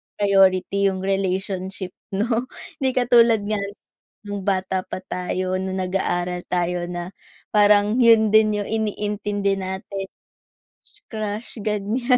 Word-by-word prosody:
ipriority 195 0 +3
yung 190 - -5
relationship 190 -1 -2 0.2
'no. 230 +4 0 0.3
Hindi 265 - +2
katulad 235 -3 +5
nga 215 -1 0 0.7
nung 205 -1 -4
bata 190 -1 0
pa - - -5
tayo, 185 +1 -2
nung 190 0 -3
nag-aaral 180 -1 -1
tayo 175 0 0
na 175 +1 -5 0.4
parang 205 +1 +5
yun 225 -2 +6
din 215 -1 +5
yung - - -7
iniintindi 205 -2 -1
natin, 190 +1 -5 1.0
crush-crush 215 +1 -5
ganyan. 220 +5 +1
200 Hz, 115 wpm, -22 LUFS, 185-215 Hz, 1.0 s, yun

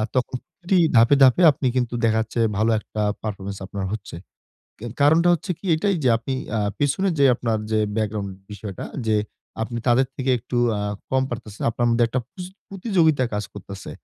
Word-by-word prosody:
তখন 130 0 0 0.2
প্রতি 185 +1 +1 0.2
ধাপে, 115 +5 +6
ধাপে 130 +7 +5
আপনি 140 -2 -2
কিন্তু 125 -2 0
দেখা 110 0 +2
যাচ্ছে 110 +2 -4 0.2
ভালো 110 +2 +2
একটা 110 0 -6 0.2
পারফরম্যান্স 100 -2 -5
আপনার 100 -1 -4
হচ্ছে। 105 -2 -6 0.6
কে 115 - -10 0.2
কারণটা 160 +4 +5
হচ্ছে 175 +4 -6
কি - - -23
এইটাই 195 +3 +1
যে 125 - +4
আপনি 130 +3 -5 0.3
আ - - +1 0.2
পেছনে 145 +7 +1
যে 140 - +5
আপনার 115 -3 -1
যে 110 - +3 0.2
ব্যাকগ্রাউন্ড 105 -2 -2 0.2
বিষয়টা 100 -1 -7 0.2
যে 110 -1 +3 0.5
আপনি 120 +1 -4
তাদের 125 +2 +4
থেকে 130 0 -1
একটু 125 +2 -5 0.2
আ - - -2 0.3
কম 130 0 +2
পারতেছেন। 110 -3 -7
আপনার 120 +1 -1
মধ্যে 115 0 +3
একটা 125 +2 -1
পুচ 185 -2 -8 0.2
প্রতিযোগিতায় 175 - +2
কাজ 105 0 -2
করতেছে। 100 -1 -9
120 Hz, 180 wpm, -23 LUFS, 110-145 Hz, 0.6 s, ধাপে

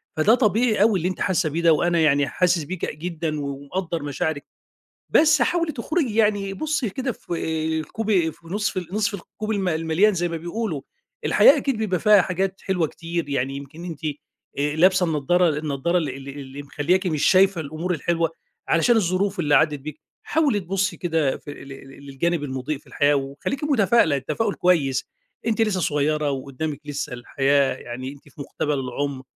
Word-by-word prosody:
فده 205 +9 +5
طبيعي 220 -2 +2
أوي 210 -4 +4
اللي 170 - -1
أنتِ 185 - -6
حاسّة 180 -3 +1
بيه 165 +3 -2
ده، 165 -1 +5
وأنا 170 +2 +2
يعني 145 -3 +3
حاسس 180 -1 +1
بيكِ 175 0 -4
جدًا 160 -2 -3
ومقدّر 145 +4 -4
مشاعرِك، 145 +1 -2 0.7
بس 305 -4 +5
حاولي 335 +3 +1
تخرجي 270 -1 -1
يعني 205 -3 +2
بُصّي 300 0 -1
كده 255 +3 -3
في 175 - -7 0.5
الكوب 220 +8 -4
في 165 -4 +1
نصف 185 -3 -2
نصف 215 +1 0
الكوب 215 +3 -6
ال 195 -4 0
المليان 165 +6 +2
زي 175 -1 0
ما 165 - -4
بيقولوا، 170 -1 -3 0.4
الحياة - - +6
أكيد 275 -4 -1
بيبقى 190 -5 -1
فيها 210 -2 +6
حاجات 190 +1 -2
حلوة 180 -4 +1
كتير 165 0 -4
يعني 135 -1 -1
يمكن 145 +5 -9
أنتِ 165 -4 -7 0.6
آآ 145 +1 0
لابسة 185 +2 +4
النضارة 165 +3 +2
النضارة 155 +4 0
ال 155 - -2
اللي 135 +1 -7
اللي 140 0 -8
مخلّياكِ 175 +7 0
مش 155 -4 0
شايفة 190 -1 +4
الأمور 160 +4 -3
الحلوة 165 +1 0 0.4
علشان 230 +9 +4
الظروف 190 -1 0
اللي 150 -3 +2
عدت 150 +1 +3
بيكِ، 150 +1 -8 0.2
حاولي 290 -10 +1
تبُصّي 195 +1 -1
كده 160 -5 0
في - - -10
ال 140 - -11
ل 135 +1 -12
للجانب 155 +4 -1
المُضيء 135 +2 -3
في - - -26
الحياة 145 -1 +2
وخلّيكِ 140 - -3
متفائلة 230 - +3
التفاؤل 200 - -1
كويس 145 -8 +2 0.4
أنتِ 225 -1 0
لسّه 200 -4 +1
صغّيرة 150 -1 +1
وقدامِك 140 +2 -4
لسّه 145 -3 -4
الحياة، 135 +2 +1
يعني 130 +2 -7
أنتِ 145 +1 -16
في 145 - -16
مقتبل 145 +1 -2
العُمر، 135 +1 -3
170 Hz, 170 wpm, -23 LUFS, 145-195 Hz, 0.7 s, الحياة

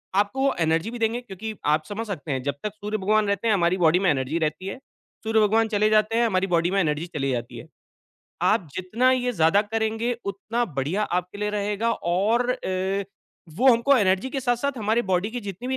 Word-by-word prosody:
आपको 205 +6 +1
वो 275 0 +3
एनर्जी 165 +6 +1
भी 240 - -7
देंगे 230 +2 0
क्योंकि 220 -1 -7
आप 155 +1 +2
समझ 215 +2 -5
सकते 165 -6 -5
हैं 130 - -1
जब 140 0 -2
तक 210 -1 -3
सूर्य 210 +1 -3
भगवान 215 +2 +2
रहते 200 +3 -1
हैं 220 - +4
हमारी 175 -2 +2
बॉडी 175 0 +4
में 190 -2 +2
एनर्जी 140 +3 0
रहती 155 +3 -2
है। 195 - -5 0.5
सूर्य 220 0 +2
भगवान 220 +2 +3
चले 215 -1 +2
जाते 215 +1 +2
हैं 235 - +3
हमारी 195 -3 +1
बॉडी 170 0 +1
में 195 - +2
एनर्जी 155 -2 0
चली 135 -2 0
जाती 120 -1 -4
है - - -10 0.7
आप 175 - +2
जितना 225 +8 +1
ये 250 -1 +1
ज़्यादा 165 +1 +3
करेंगे 225 +2 -1
उतना 205 +4 -2
बढ़िया 160 +11 0
आपके 180 +1 -3
लिए 210 0 -1
रहेगा 210 +2 -1
और 220 +7 0
अ, 190 -4 -2 0.5
वो 260 +6 +6
हमको 240 +4 +4
एनर्जी 195 +3 +1
के 270 - -3
साथ-साथ 260 +2 -1
हमारी 220 +2 +1
बॉडी 185 +3 +1
की 245 - -4
जितनी 205 +4 -6
205 Hz, 210 wpm, -24 LUFS, 180-225 Hz, 0.7 s, वो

